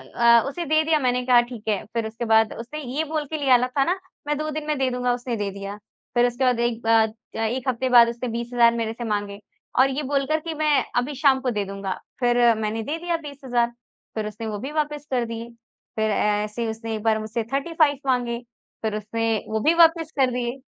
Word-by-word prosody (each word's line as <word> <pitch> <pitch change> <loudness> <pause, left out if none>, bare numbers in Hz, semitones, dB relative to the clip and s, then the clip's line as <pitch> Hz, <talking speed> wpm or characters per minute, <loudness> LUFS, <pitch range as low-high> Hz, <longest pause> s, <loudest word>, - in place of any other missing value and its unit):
अ, 235 -1 +6
उसे 340 +5 -4
दे 310 +1 +3
दिया 315 -1 +2
मैंने 250 -2 0
कहा 245 -1 +6
ठीक 240 -3 -9
है, 205 -2 0
फ़िर 225 0 -3
उसके 225 +2 -5
बाद 220 -1 +4
उसने 275 +7 -6 0.2
ये 315 - +1
बोल 310 -1 -2
के 310 +2 -3
लिया 265 -4 +5
ला 250 +1 0
था 270 +2 +1
ना, 360 +6 0 0.3
मैं 295 0 0
2 310 0 -3
दिन 305 0 -4
में 300 - 0
दे 260 -1 +2
दूँगा 250 0 0
उसने 245 0 -3
दे 205 -2 -2
दिया। 200 +1 -7 0.4
फ़िर 240 - +5
उसके 245 +2 -2
बाद 250 -2 +2
एक 235 -1 0
बाद 225 -1 +3 0.2
क - - -4
1 255 +3 -4
हफ्ते 255 +1 -1
बाद 240 -2 +8
उसने 240 +2 -4
20 235 +1 -4
हज़ार 235 -1 +5
मेरे 225 -1 -2
से 240 - -7
माँगे 205 -2 -2 0.4
और 265 - +6
ये 280 +3 -2
बोलकर 280 +3 0
कि 325 +1 -5
मैं 300 -4 +2
अभी 250 +4 0
शाम 270 -1 +4
को 260 - 0
दे 210 -2 -1
दूँगा। 195 -1 -4 0.3
फ़िर 245 -1 +2 0.2
मैंने 220 +1 -2
दे 300 +7 -3
दिया 345 0 -1
20 290 -3 -10
हज़ार, 240 -2 +2 0.5
फ़िर 215 -1 -2
उसने 215 +2 -6
वो 210 -2 -4
भी 270 +5 -5
वापस 295 -1 -2
कर 245 -2 +1
दिए। 230 0 -6 0.5
फ़िर 220 0 +1
ए - - +1 0.3
ऐसे 210 +2 -5
ही 230 - 0
उसने 225 0 -4
एक 215 - -6
बार 220 -1 +2
मुझसे 220 +1 -3
35 295 0 +2
माँगे, 245 -2 0 0.4
फ़िर 215 -1 -1
उसने 225 +2 -2 0.2
वो 220 0 0
भी 310 +9 +3
वापस 330 -1 +4
कर 260 -2 +4
दिए। 245 +1 -3
245 Hz, 240 wpm, -24 LUFS, 225-285 Hz, 0.5 s, बाद